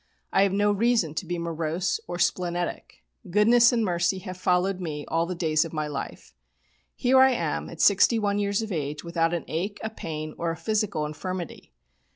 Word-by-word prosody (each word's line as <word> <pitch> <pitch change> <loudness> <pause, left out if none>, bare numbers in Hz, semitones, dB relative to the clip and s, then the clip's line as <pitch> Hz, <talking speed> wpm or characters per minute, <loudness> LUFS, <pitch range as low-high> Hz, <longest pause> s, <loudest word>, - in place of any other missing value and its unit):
I - - +4
have 200 -1 +3
no 205 +1 +2
reason 210 -6 +1
to 160 +3 -4
be 175 +1 -2
morose 170 +2 -2
or 175 0 -4
splenetic. 175 - -2 0.3
'Goodness 230 +6 +5
and 230 -3 +1
mercy 175 +1 +1
have 185 0 -7
followed 185 +1 +1
me 150 -4 -4
all 165 +1 0
the 180 - -3
days 155 -3 +2
of 165 - -8
my 155 -1 -1
life.' 140 - -7 0.6
Here 260 +1 +3
I 265 0 +6
am 245 - -2
at - - -11
61 205 -3 +4
years 205 +1 0
of 220 - -6
age 150 -3 -3
without 170 -1 0
an 170 -1 -3
ache, 190 +6 -3
a 220 - -3
pain, 155 -6 -6
or 170 - -1
a 165 - -3
physical 210 -8 -1
infirmity. 175 +3 -6
180 Hz, 190 wpm, -26 LUFS, 165-205 Hz, 0.6 s, I